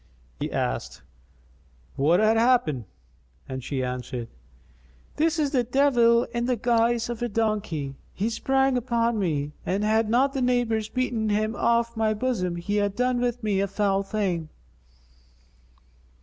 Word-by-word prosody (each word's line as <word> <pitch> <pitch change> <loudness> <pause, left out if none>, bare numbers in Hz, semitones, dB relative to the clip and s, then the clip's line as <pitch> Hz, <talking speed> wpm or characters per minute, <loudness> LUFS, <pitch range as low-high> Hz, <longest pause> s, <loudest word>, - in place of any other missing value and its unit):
He - - -3
asked, - - -3 0.9
"What 160 +6 +3
hath 215 +1 +4
happened?"; 225 - +2 0.6
and 130 -1 -5
she 130 0 -2
answered, 125 -1 -4 0.9
"This 325 +2 +2
is 295 -2 0
a 250 -3 +3
devil 240 -2 +4
in 235 0 -1
the 250 - +2
guise 235 0 +1
of 240 -1 -5
a 240 - -1
donkey. 205 -11 -1 0.2
He 215 +4 -2
sprang 270 +2 +1
upon 235 -2 0
me, 150 -6 -1
and 195 +3 -1
had 220 +1 +2
not 265 +4 +3
the 270 - -2
neighbours 240 -3 +1
beaten 240 -3 -1
him 215 +2 0
off 235 0 +1
my 220 -1 +1
bosom 210 -7 -1
he 190 +4 -2
had 205 -1 0
done 250 +1 +1
with 245 -1 -1
me 205 -3 +1
a 200 - 0
foul 195 0 +1
thing." 195 -6 -2
220 Hz, 150 wpm, -25 LUFS, 195-240 Hz, 0.9 s, hath